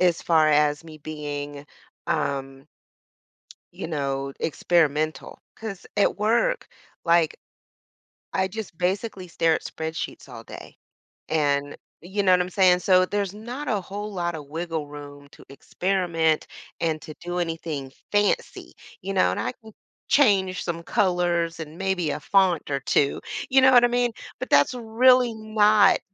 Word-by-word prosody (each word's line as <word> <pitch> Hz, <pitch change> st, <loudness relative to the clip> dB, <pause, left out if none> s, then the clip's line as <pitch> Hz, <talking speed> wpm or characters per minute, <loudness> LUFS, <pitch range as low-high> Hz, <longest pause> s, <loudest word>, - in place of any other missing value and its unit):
as 175 Hz, -2 st, +2 dB
far 160 Hz, -2 st, +4 dB
as 150 Hz, +1 st, +2 dB
me 155 Hz, -1 st, -11 dB
being, 145 Hz, -1 st, -6 dB, 0.4 s
um 135 Hz, 0 st, -2 dB, 1.1 s
you -, -, -6 dB
know, 140 Hz, -3 st, -2 dB
experimental. 155 Hz, -1 st, 0 dB, 0.2 s
'Cause 210 Hz, -4 st, -7 dB
at 205 Hz, -, +2 dB
work, 235 Hz, -, +1 dB, 0.4 s
like, 170 Hz, -2 st, +3 dB, 1.0 s
I 190 Hz, 0 st, +1 dB
just 205 Hz, -4 st, -7 dB
basically 185 Hz, 0 st, -2 dB
stare 165 Hz, -1 st, +2 dB
at -, -, -3 dB
spreadsheets 160 Hz, -3 st, -5 dB
all 115 Hz, -2 st, -10 dB
day. -, -, -11 dB, 0.5 s
And 145 Hz, -2 st, 0 dB, 0.2 s
you 190 Hz, +4 st, -2 dB
know 185 Hz, -1 st, +5 dB
what 180 Hz, -, +4 dB
I'm 180 Hz, -, -3 dB
saying? 180 Hz, -1 st, +4 dB
So 185 Hz, 0 st, +4 dB
there's 200 Hz, -1 st, -2 dB
not 245 Hz, +7 st, -7 dB
a 210 Hz, -4 st, +1 dB
whole 205 Hz, +3 st, -6 dB
lot 175 Hz, -3 st, -2 dB
of 150 Hz, -3 st, -8 dB
wiggle 160 Hz, -1 st, -4 dB
room 145 Hz, -1 st, -11 dB
to -, -, -17 dB
experiment 165 Hz, +1 st, 0 dB, 0.3 s
and 160 Hz, -2 st, 0 dB
to 155 Hz, -, -9 dB
do 175 Hz, +1 st, -3 dB
anything 160 Hz, -5 st, -4 dB, 0.2 s
fancy, 205 Hz, 0 st, 0 dB, 0.3 s
you 195 Hz, +2 st, -4 dB
know? 185 Hz, -, +3 dB
And -, -, -3 dB
I -, -, -2 dB
can 220 Hz, -2 st, -16 dB, 0.4 s
change 195 Hz, -9 st, +3 dB
some 170 Hz, -1 st, -4 dB
colors 175 Hz, -3 st, 0 dB
and 155 Hz, +1 st, -9 dB
maybe 190 Hz, -4 st, -1 dB
a -, -, -2 dB
font 190 Hz, -6 st, +2 dB
or 140 Hz, -2 st, -1 dB
two. 140 Hz, +1 st, +1 dB, 0.3 s
You 265 Hz, 0 st, +5 dB
know 265 Hz, -, +7 dB
what 245 Hz, -1 st, +7 dB
I -, -, +4 dB
mean? 245 Hz, 0 st, +1 dB, 0.3 s
But -, -, -5 dB
that's 145 Hz, -, +4 dB
really 245 Hz, +1 st, +4 dB
not 215 Hz, -2 st, +4 dB
175 Hz, 150 wpm, -24 LUFS, 155-205 Hz, 1.1 s, know